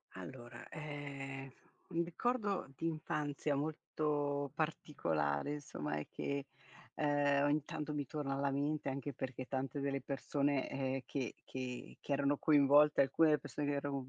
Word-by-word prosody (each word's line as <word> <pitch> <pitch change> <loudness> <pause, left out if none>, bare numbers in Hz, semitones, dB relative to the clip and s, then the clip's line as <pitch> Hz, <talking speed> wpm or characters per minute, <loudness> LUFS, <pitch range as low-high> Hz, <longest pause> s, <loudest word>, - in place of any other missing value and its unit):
Allora, 120 -2 -8
ehm, 140 -3 -5 0.4
un 170 +1 +1
ricordo 200 - 0
di 165 - -1
infanzia 150 -2 -1
molto 145 -1 0
particolare 85 - 0
insomma 75 - -3
e 75 - -4
che, 140 0 -2 0.5
ehm, 145 -1 +3
ogni 145 0 +3
tanto 150 -1 -3
mi 145 -2 -1
torna 145 -3 -2
alla 140 0 +1
mente 145 +1 0
anche 140 +1 -3
perché 130 0 -4
tante 135 +2 -2
delle 140 0 0
persone, 140 0 0
ehm, 135 0 -1
che 130 -4 -2
che 125 -1 -5
che - - -7
erano 140 0 +3
coinvolte 145 0 +6
alcune 145 +4 +5
delle 150 -1 +5
persone 145 -1 -3
che 145 - +2
erano 140 -2 -2
140 Hz, 145 wpm, -37 LUFS, 135-150 Hz, 0.5 s, coinvolte